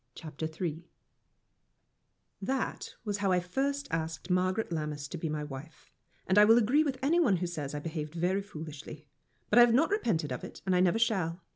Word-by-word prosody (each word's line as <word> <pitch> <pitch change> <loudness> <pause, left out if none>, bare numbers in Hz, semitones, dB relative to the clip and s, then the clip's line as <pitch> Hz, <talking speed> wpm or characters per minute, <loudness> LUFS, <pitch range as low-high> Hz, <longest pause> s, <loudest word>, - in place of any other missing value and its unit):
CHAPTER 160 0 -5
III 160 0 -4 1.6
That 260 +7 -3
was 205 -1 -1
how 200 -2 +1
I 180 - +4
first 275 +10 -2
asked 160 +2 -3
Margaret 185 +3 +1
Lammas 150 -3 -3
to 175 - -5
be 160 - -2
my 150 0 -2
wife, 145 +2 -10 0.3
and 190 +2 +4
I 210 - +8
will 225 +2 +7
agree 245 +7 +4
with 275 -4 -2
any 325 +5 +3
one 230 - +3
who 180 - -2
says 150 -5 -4
I - - -2
behaved 155 0 -5
very 180 +4 +1
foolishly. 155 -5 -9 0.5
But 225 - +7
I - - +11
have 240 -1 +6
not 315 +9 +3
repented 195 - 0
of 125 - -4
it, - - -9
and 185 -1 +2
I - - +4
never 180 +3 +3
shall. 190 -7 0
180 Hz, 195 wpm, -30 LUFS, 160-220 Hz, 1.6 s, I